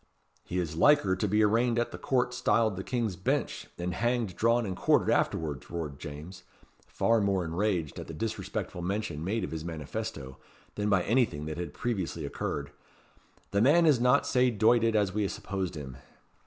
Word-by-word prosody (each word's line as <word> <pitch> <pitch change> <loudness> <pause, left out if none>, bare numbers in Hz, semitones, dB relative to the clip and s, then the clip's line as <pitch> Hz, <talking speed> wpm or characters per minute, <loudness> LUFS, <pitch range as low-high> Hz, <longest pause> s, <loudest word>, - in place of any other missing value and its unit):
"He 90 - -4
is 85 -4 -2
liker 100 - +4
to 100 +3 -1
be 105 +2 +3
arraigned 115 +3 +2
at 120 - -1
our - - -7
court 125 -2 0
styled 115 -3 +2
the 95 - -5
King's 115 -5 -1
Bench, 90 - -2
and 90 +1 -3
hanged, 120 -4 0
drawn, 115 +1 +2
and 95 -2 -3
quartered - - +3
afterwards," 75 -5 -1
roared 80 -5 -5
James, 80 +5 -8 0.5
far 115 -1 +2
more 100 -3 +1
enraged 85 -2 -1
at - - -7
the - - -7
disrespectful 105 -2 -4
mention 90 -4 -3
made 110 +6 -1
of - - -4
his 80 -1 -4
manifesto, 75 -4 -5 0.4
than 105 0 -1
by 95 -3 +3
anything 110 - +1
that 80 +2 -5
had 85 -4 -4
previously 105 -8 -2
occurred. 70 -1 -4 0.8
"The 100 - +2
man 155 +8 +5
is 150 -6 +5
not 125 +3 +4
sae 125 -1 +3
doited 115 0 +3
as 100 -3 +2
we 105 -1 0
supposed 95 -3 -4
him." 70 -5 -7
100 Hz, 180 wpm, -29 LUFS, 85-115 Hz, 0.8 s, man